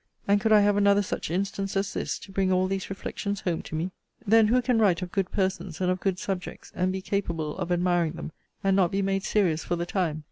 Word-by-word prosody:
And 200 0 +3
could 220 - +1
I 210 -1 +7
have 205 0 +3
another 200 0 +4
such 185 - -4
instance, 195 +2 -2
as 195 0 -1
this, - - -2
to 195 - -12
bring 190 -1 +1
all 185 0 +3
these 190 0 -3
reflections 200 +1 -4
home 175 -3 -1
to - - -7
me? 170 +4 -2 0.3
Then 220 +1 +5
who 245 +4 +4
can 250 -2 +1
write 190 -5 +3
of 180 - -6
good 195 -2 -1
persons, 190 -3 -2
and 180 -1 +1
of 185 - -1
good 190 -1 0
subjects, 185 -1 -5
and 185 +1 0
be 190 0 -4
capable 165 -7 -2
of 180 -1 -3
admiring 175 -2 +2
them, 165 - -7 0.3
and 195 -1 +3
not 185 -3 +4
be 195 +2 -1
made 195 0 0
serious 175 -8 +1
for 175 - -1
the 170 0 -2
time? 175 -4 -1
190 Hz, 245 wpm, -27 LUFS, 180-200 Hz, 0.3 s, I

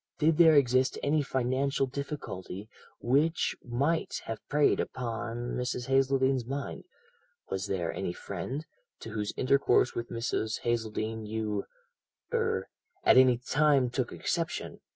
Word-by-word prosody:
Did 155 0 +2
there 160 -2 +8
exist 130 -1 +3
any 150 +1 +2
financial 135 +1 0
difficulty 125 - -6 0.3
which 145 +7 +2
might 140 +7 0
have 115 -1 -4
preyed 145 0 +3
upon 120 0 -3
Mrs. 125 0 -2
Hazeldene's 135 -1 +2
mind; 140 +4 -5 0.7
was 95 +1 -2
there 90 -4 -1
any 95 -2 -2
friend 100 - -5 0.4
to 115 - -7
whose 105 -1 -2
intercourse 135 -1 +3
with 120 0 -4
Mrs. 115 -1 -2
Hazeldene 110 -1 -2
you 105 -2 -2 0.7
er - - 0 0.4
at - - +6
any 130 -2 +6
time 135 0 +2
took 125 -1 -1
exception? 165 -1 -3
125 Hz, 125 wpm, -30 LUFS, 110-140 Hz, 0.7 s, there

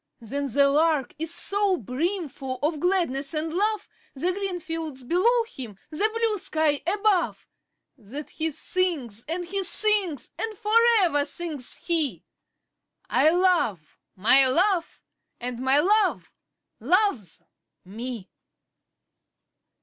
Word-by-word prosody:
But 275 +5 -4
the 280 0 +5
Lark 295 -2 +1
is 325 0 -1
so 395 +2 +1
brimful 275 - -3
of 305 0 0
gladness 330 -5 0
and 315 +1 -2
love, 420 +3 0 0.3
The 345 +7 0
green 385 -1 -3
fields 320 -5 -6
below 440 - +2
him, 250 - -10
the 415 +8 +2
blue 450 -3 0
sky 310 -3 0
above, 405 -1 +1 0.5
That 255 +8 -8
he 320 0 -2
sings, 290 - -1
and 350 +3 -3
he 390 +3 -2
sings; 390 - +2
and 440 -2 -3
for 430 -1 -3 0.3
ever 290 -6 +2
sings 290 -3 -2
he 325 -5 0 0.9
'I 310 - +5
love 335 - +1 0.2
my 255 +8 +5
Love, 350 +5 0 0.4
and 245 0 -5
my 265 +2 +3
Love 415 +6 +1 0.5
loves 275 - 0 0.4
me!' 225 +1 -7
320 Hz, 120 wpm, -25 LUFS, 265-375 Hz, 0.9 s, the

